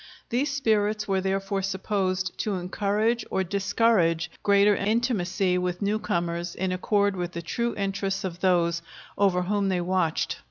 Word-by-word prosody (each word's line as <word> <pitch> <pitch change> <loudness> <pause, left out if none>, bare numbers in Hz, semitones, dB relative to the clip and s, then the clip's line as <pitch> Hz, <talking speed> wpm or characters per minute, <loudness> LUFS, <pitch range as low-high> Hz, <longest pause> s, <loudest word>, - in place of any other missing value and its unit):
These 260 +5 0
spirits 215 -6 +1
were 190 -1 +1
therefore 195 +1 -1
supposed 190 -1 -1
to 210 -2 -1
encourage 205 +5 0
or 190 - 0
discourage 190 -4 +1
greater 200 0 +4
intimacy 195 -4 +1
with 180 +2 -2
newcomers 175 -4 -1
in 185 0 -1
accord 200 +2 +1
with 175 -1 -4
the 170 - -5
true 235 +7 -2
interests 195 0 -2
of 180 -2 -4
those 170 -2 +2 0.3
over 190 -3 +2
whom 200 +1 0
they 185 -1 +1
watched. 175 -2 0
195 Hz, 145 wpm, -26 LUFS, 180-205 Hz, 0.3 s, greater